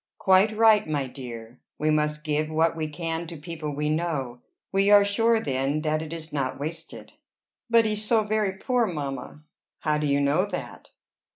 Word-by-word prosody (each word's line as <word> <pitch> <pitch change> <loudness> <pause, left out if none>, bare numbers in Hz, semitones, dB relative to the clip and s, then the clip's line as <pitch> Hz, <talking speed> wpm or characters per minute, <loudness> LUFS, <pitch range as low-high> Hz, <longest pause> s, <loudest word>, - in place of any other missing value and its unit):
"Quite 195 +3 +3
right, 220 -3 +5
my 145 -3 0
dear. 120 -2 -9 0.2
We 155 +1 +1
must 150 0 0
give 155 0 -1
what 160 +1 +1
we 160 -1 -2
can 165 +1 -4
to 165 0 -8
people 155 -1 -6
we 150 +1 -1
know. 150 -6 -2 0.3
We 195 +1 +2
are 205 -1 +7
sure 225 +3 +3
then 135 -2 -1
that 155 0 0
it 160 -1 -7
is 165 -2 -7
not 135 -3 -2
wasted." 165 +3 -6 0.6
"But 230 -1 +5
he's 210 0 0
so 220 0 +3
very 210 -2 0
poor, 240 +4 0
mamma!" 145 -3 -5 0.4
"How 150 -1 +1
do 150 - 0
you 140 0 +2
know 145 +8 +2
that?" - - -7
155 Hz, 180 wpm, -25 LUFS, 145-200 Hz, 0.6 s, are